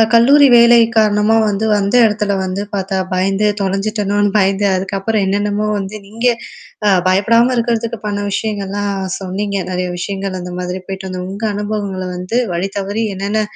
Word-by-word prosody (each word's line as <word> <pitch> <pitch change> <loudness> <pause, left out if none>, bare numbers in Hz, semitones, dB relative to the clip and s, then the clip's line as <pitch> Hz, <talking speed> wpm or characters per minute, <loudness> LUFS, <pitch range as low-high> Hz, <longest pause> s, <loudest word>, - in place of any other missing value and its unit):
அ - - +7
கல்லூரி 280 +5 +6
வேலை 235 0 +7 0.2
காரணமா 215 0 +3
வந்து 205 +2 -1
அந்த 200 +4 -1
இடத்துல 210 -1 -1
வந்து 190 +2 -3
பார்த்தா 190 0 -2 0.2
பயந்து 195 +3 +1
தொலைஞ்சுட்டோன்னு 205 +1 0
பயந்து 195 0 +2
அதுக்கப்புறம் 195 +3 -1
என்னென்னமோ 205 +2 0
வந்து 195 +2 -5
நீங்க 230 +4 -3 0.6
அ - - +5 0.2
பயப்படாம 230 +6 +3
இருக்கிறதுக்கு 230 -1 -1
பண்ண 205 -1 -2
விஷயங்கள்லாம் 205 -1 -2 0.3
சொன்னீங்க. 200 +2 -3
நெறைய 180 0 -2
விஷயங்கள் 195 0 -4
அந்த 180 0 -7
மாதிரி 180 +1 -4
போயிட்டு 190 0 -6
வந்து 185 -1 -5
உங்க 200 +3 -6
அனுபவங்கள 205 -2 -3
வந்து 185 +7 -2
வழி 180 +3 -1
தவறி 205 +3 -2
என்னென்ன 200 +3 -1
200 Hz, 150 wpm, -16 LUFS, 190-215 Hz, 0.6 s, அ